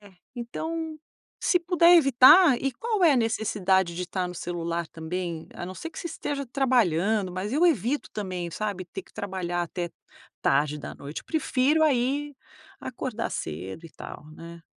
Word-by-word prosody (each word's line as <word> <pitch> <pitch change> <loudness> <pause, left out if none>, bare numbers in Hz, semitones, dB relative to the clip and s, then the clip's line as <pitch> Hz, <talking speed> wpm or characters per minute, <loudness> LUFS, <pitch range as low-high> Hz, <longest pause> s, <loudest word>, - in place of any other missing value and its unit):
É. 205 -2 -16 0.2
Então, 320 +6 -4 0.4
se 355 - +3
puder 345 0 +6
evitar, 275 +2 +7
e 270 -1 -1
qual 440 - -2
é 320 - +7
a - - +3
necessidade 195 -6 +1
de 180 - -3
estar 180 0 -3
no 180 - -7
celular 170 -1 -3
também? 165 0 -5
A - - -6
não 185 - -7
ser 330 - -7
que 315 - -10
você - - -5
esteja 280 -4 -4
trabalhando, 220 - +1
mas 190 +4 -4
eu 315 +6 +4
evito 285 - 0
também, 185 -4 -4
sabe, 200 0 -3
ter 185 +2 -8
que - - -24
trabalhar 180 -3 -3
até 175 0 -4 0.5
tarde 145 +2 +2
da - - -7
noite. 145 +2 -7
Eu - - -45
prefiro, 305 -1 +2
aí, 280 +1 +1 0.5
acordar 245 -2 -4
cedo 90 - -5
e - - -15
tal, 150 - -10
né? 170 +1 -11
205 Hz, 170 wpm, -26 LUFS, 175-280 Hz, 0.5 s, evitar